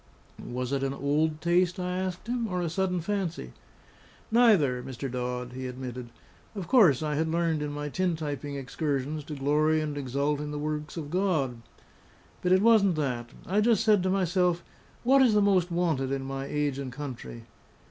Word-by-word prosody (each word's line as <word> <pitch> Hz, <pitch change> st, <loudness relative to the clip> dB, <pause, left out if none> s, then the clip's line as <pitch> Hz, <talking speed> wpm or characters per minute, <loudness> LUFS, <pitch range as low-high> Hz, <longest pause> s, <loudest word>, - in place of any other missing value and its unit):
"Was 125 Hz, +2 st, -4 dB
it 135 Hz, -, 0 dB
an 135 Hz, 0 st, -1 dB
old 150 Hz, +3 st, 0 dB
taste?" 180 Hz, +1 st, +2 dB
I 180 Hz, 0 st, -2 dB
asked 185 Hz, 0 st, -4 dB
him, 235 Hz, 0 st, -1 dB
"or 180 Hz, -3 st, -2 dB
a 165 Hz, -, -2 dB
sudden 180 Hz, 0 st, 0 dB
fancy?" 175 Hz, -, -3 dB, 0.8 s
"Neither, 200 Hz, -, +4 dB
Mr. 130 Hz, +1 st, -6 dB
Dodd," 125 Hz, 0 st, -3 dB
he 130 Hz, 0 st, -5 dB
admitted. 125 Hz, -1 st, -6 dB, 0.5 s
"Of 190 Hz, -5 st, -5 dB
course 175 Hz, -, +5 dB
I 150 Hz, -1 st, -1 dB
had 160 Hz, +2 st, 0 dB
learned 165 Hz, -1 st, 0 dB
in 150 Hz, 0 st, -3 dB
my 145 Hz, 0 st, -4 dB
tin 180 Hz, +3 st, 0 dB
typing 145 Hz, -2 st, -4 dB
excursions 140 Hz, +2 st, -2 dB
to 150 Hz, -, -6 dB
glory 150 Hz, +3 st, +2 dB
and 150 Hz, -1 st, -3 dB
exult 140 Hz, +2 st, -1 dB
in 150 Hz, 0 st, -4 dB
the 150 Hz, -, -4 dB
works 150 Hz, +1 st, -4 dB
of 150 Hz, -3 st, -5 dB
God. 155 Hz, -11 st, 0 dB, 0.8 s
But 180 Hz, -, 0 dB
it 185 Hz, +2 st, +5 dB
wasn't 215 Hz, -6 st, +5 dB
that. 125 Hz, -6 st, -2 dB, 0.2 s
I 200 Hz, +4 st, +1 dB
just 225 Hz, -2 st, +3 dB
said 210 Hz, -3 st, +4 dB
to 185 Hz, -, 0 dB
myself, 180 Hz, -2 st, +1 dB, 0.4 s
What 270 Hz, +3 st, +5 dB
is 240 Hz, -5 st, +5 dB
most 195 Hz, -4 st, +3 dB
wanted 165 Hz, -7 st, 0 dB
in 135 Hz, -1 st, -2 dB
my 135 Hz, 0 st, -4 dB
age 145 Hz, -2 st, -1 dB
and 135 Hz, -2 st, -5 dB
country? 125 Hz, -4 st, -7 dB
155 Hz, 180 wpm, -28 LUFS, 135-180 Hz, 0.8 s, course